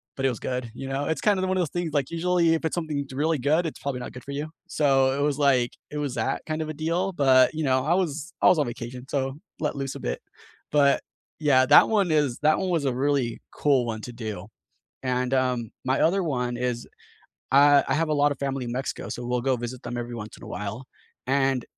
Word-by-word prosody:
but 135 Hz, -, -2 dB
it -, -, +4 dB
was 120 Hz, -, -4 dB
good, 125 Hz, -3 st, -3 dB
you 135 Hz, -, -7 dB
know? 140 Hz, +2 st, -1 dB
It's 160 Hz, -4 st, -1 dB
kinda 200 Hz, -3 st, +2 dB
one 185 Hz, 0 st, 0 dB
of -, -, +2 dB
those 170 Hz, -, -1 dB
things, 175 Hz, 0 st, -3 dB
like, 140 Hz, -3 st, 0 dB
usually, 170 Hz, -1 st, +2 dB
if 160 Hz, -, -3 dB
it's 160 Hz, -, -1 dB
something 160 Hz, -4 st, -2 dB
that's 140 Hz, -2 st, -9 dB
really 155 Hz, +3 st, +1 dB
good, 155 Hz, +6 st, +2 dB
it's 155 Hz, -, -7 dB
probably 135 Hz, -2 st, -3 dB
not 125 Hz, -, -6 dB
good 125 Hz, -, -10 dB
for 140 Hz, -, -8 dB
you. 145 Hz, +2 st, -4 dB, 0.2 s
So 135 Hz, -2 st, +2 dB
it -, -, 0 dB
was 145 Hz, -1 st, +1 dB
like 130 Hz, -4 st, +3 dB, 0.2 s
it 150 Hz, -, -5 dB
was 140 Hz, -4 st, -2 dB
that -, -, -1 dB
kind 155 Hz, 0 st, -2 dB
of 155 Hz, -, -6 dB
a -, -, -3 dB
deal, 165 Hz, +5 st, -1 dB
but, 130 Hz, -5 st, +5 dB
you 160 Hz, 0 st, -2 dB
know, 130 Hz, -1 st, +2 dB
I 160 Hz, -, +3 dB
was 170 Hz, -1 st, -2 dB
I -, -, +6 dB
was 180 Hz, -, +6 dB
on 145 Hz, -, +2 dB
vacation, 125 Hz, +2 st, -7 dB
so 135 Hz, 0 st, -2 dB, 0.2 s
let 150 Hz, -, -1 dB
loose 135 Hz, -1 st, -3 dB
a -, -, -6 dB
bit, -, -, -3 dB, 0.5 s
but, 140 Hz, -1 st, +4 dB, 0.4 s
yeah, 135 Hz, -4 st, +4 dB
that 145 Hz, -, +8 dB
one 205 Hz, -5 st, +2 dB
is 145 Hz, -6 st, +1 dB
that 155 Hz, +1 st, +3 dB
one 190 Hz, -, -1 dB
was 165 Hz, -5 st, 0 dB
a 135 Hz, -, +1 dB
really 135 Hz, -3 st, 0 dB
cool 135 Hz, -4 st, +2 dB
one 110 Hz, -2 st, -4 dB
to 125 Hz, -, -6 dB
do, 110 Hz, -5 st, -6 dB, 0.6 s
and, 125 Hz, 0 st, -1 dB
um, 125 Hz, -4 st, 0 dB, 0.2 s
my 130 Hz, +1 st, +2 dB
other 190 Hz, +4 st, +3 dB
one 125 Hz, -5 st, -1 dB
is 125 Hz, -1 st, -2 dB, 0.7 s
I 145 Hz, +1 st, +7 dB
I 135 Hz, -, +2 dB
have 160 Hz, +2 st, +1 dB
a -, -, +2 dB
lot 145 Hz, 0 st, +3 dB
of -, -, -9 dB
family 135 Hz, -2 st, -2 dB
in 120 Hz, -, -4 dB
Mexico, 130 Hz, +2 st, -4 dB
so 120 Hz, -, -5 dB
we'll 125 Hz, 0 st, 0 dB
go 130 Hz, 0 st, +2 dB
visit 120 Hz, +1 st, -6 dB
them 120 Hz, 0 st, -5 dB
every 120 Hz, 0 st, -5 dB
once 110 Hz, -1 st, -8 dB
in -, -, -16 dB
a -, -, -10 dB
while, 105 Hz, +5 st, -5 dB, 0.4 s
and 135 Hz, -1 st, +1 dB
135 Hz, 250 wpm, -25 LUFS, 125-155 Hz, 0.7 s, that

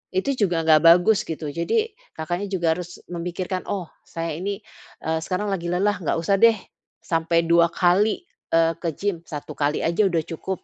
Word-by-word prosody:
itu 190 Hz, +9 st, +1 dB
juga 175 Hz, -6 st, +1 dB
nggak 160 Hz, -1 st, +6 dB
bagus 180 Hz, +5 st, +5 dB
gitu. 155 Hz, -2 st, -4 dB
Jadi 430 Hz, -, 0 dB, 0.2 s
Kakaknya 175 Hz, +5 st, -3 dB
juga 175 Hz, -4 st, 0 dB
harus 175 Hz, -1 st, -9 dB
memikirkan, 180 Hz, +2 st, -4 dB
oh, 185 Hz, -5 st, -4 dB, 0.2 s
saya 165 Hz, 0 st, -4 dB
ini, 200 Hz, +3 st, -4 dB, 0.4 s
eee, 160 Hz, 0 st, 0 dB
sekarang 190 Hz, +5 st, -2 dB
lagi 175 Hz, -3 st, -2 dB
lelah, 190 Hz, +3 st, +1 dB
nggak 165 Hz, -, -1 dB
usah 190 Hz, +4 st, +1 dB
deh. 230 Hz, +1 st, +6 dB, 0.5 s
Sampai 165 Hz, 0 st, +1 dB
2 170 Hz, 0 st, +5 dB
kali, 185 Hz, -, +2 dB, 0.3 s
eee, 165 Hz, 0 st, +4 dB
ke 170 Hz, -, -2 dB
gym, 195 Hz, -5 st, -2 dB
1 150 Hz, -2 st, -7 dB
kali 145 Hz, +1 st, 0 dB
aja 170 Hz, +5 st, +2 dB
udah 170 Hz, -4 st, 0 dB
cukup, 175 Hz, +3 st, -5 dB
175 Hz, 175 wpm, -23 LUFS, 165-195 Hz, 0.5 s, nggak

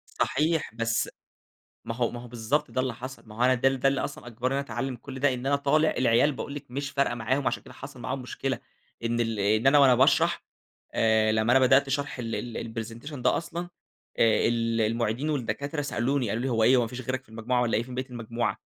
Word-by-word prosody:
صحيح، 155 Hz, -3 st, 0 dB
بس 115 Hz, 0 st, 0 dB, 0.8 s
ما 115 Hz, 0 st, -4 dB
هو 120 Hz, -1 st, 0 dB
ما 120 Hz, -, -7 dB
هو 120 Hz, -, -10 dB
بالضبط 125 Hz, +6 st, -1 dB
ده 130 Hz, -, 0 dB
اللي 130 Hz, -2 st, -2 dB
حصل. 130 Hz, +3 st, -8 dB
ما 105 Hz, -, -12 dB
هو 115 Hz, -, -5 dB
أنا 130 Hz, -, +5 dB
ده 125 Hz, -, +2 dB
ال 135 Hz, -1 st, +1 dB
ده 135 Hz, -, +3 dB
اللي 135 Hz, -, -1 dB
أصلًا 120 Hz, -, -6 dB
أجبرني 120 Hz, +3 st, -2 dB
إن -, -, +1 dB
أنا 140 Hz, -, -4 dB
أتعلّم 125 Hz, +2 st, -3 dB
كل 130 Hz, +2 st, -9 dB
ده، 140 Hz, 0 st, +3 dB
إن 125 Hz, +1 st, -5 dB
أنا 140 Hz, +1 st, +3 dB
طالع 150 Hz, +3 st, +3 dB
العيال 125 Hz, +4 st, +4 dB
باقول 140 Hz, +1 st, -6 dB
لِك 145 Hz, -, -7 dB
مش 140 Hz, +2 st, -3 dB
فارقة 140 Hz, -3 st, +1 dB
معاهم 130 Hz, +4 st, 0 dB
عشان -, -, -2 dB
كده -, -, -13 dB
حصل -, -, -10 dB
معاهم -, -, -3 dB
مشكلة -, -, -3 dB, 0.4 s
إن 115 Hz, 0 st, 0 dB
ال 115 Hz, -3 st, -1 dB
إن 110 Hz, +5 st, +2 dB
أنا 145 Hz, +2 st, +6 dB
وأنا 135 Hz, -3 st, +7 dB
باشرح 130 Hz, -, +3 dB, 0.5 s
آآ 110 Hz, -1 st, +3 dB
لمّا 110 Hz, +2 st, +2 dB
أنا 130 Hz, -, +6 dB
بدأت 135 Hz, +2 st, +4 dB
شرح 140 Hz, -1 st, -2 dB
ال 115 Hz, -2 st, -3 dB, 0.2 s
ال 115 Hz, -1 st, -5 dB
الpresentation 120 Hz, +7 st, -9 dB
ده 125 Hz, -, +2 dB
أصلًا 170 Hz, +1 st, -5 dB, 0.5 s
آآ 110 Hz, -2 st, +4 dB
ال 115 Hz, -1 st, +1 dB
المُعيدين 115 Hz, +5 st, 0 dB
والدكاترة 145 Hz, +2 st, -2 dB
سألوني 135 Hz, -3 st, 0 dB
قالوا 110 Hz, +4 st, -1 dB
لي: 135 Hz, -, 0 dB
"هو 115 Hz, -2 st, +2 dB
إيه، 125 Hz, +4 st, +6 dB
هو -, -, +4 dB
ما 115 Hz, -, -1 dB
فيش 125 Hz, +2 st, -7 dB
غيرك 130 Hz, +1 st, -3 dB
في -, -, -27 dB
المجموعة 115 Hz, +3 st, -1 dB
والّا 115 Hz, -3 st, +1 dB
إيه 115 Hz, -, 0 dB
فين 125 Hz, 0 st, -9 dB
بقية 130 Hz, 0 st, -4 dB
المجموعة؟" 115 Hz, -1 st, -2 dB
125 Hz, 235 wpm, -27 LUFS, 115-140 Hz, 0.8 s, وأنا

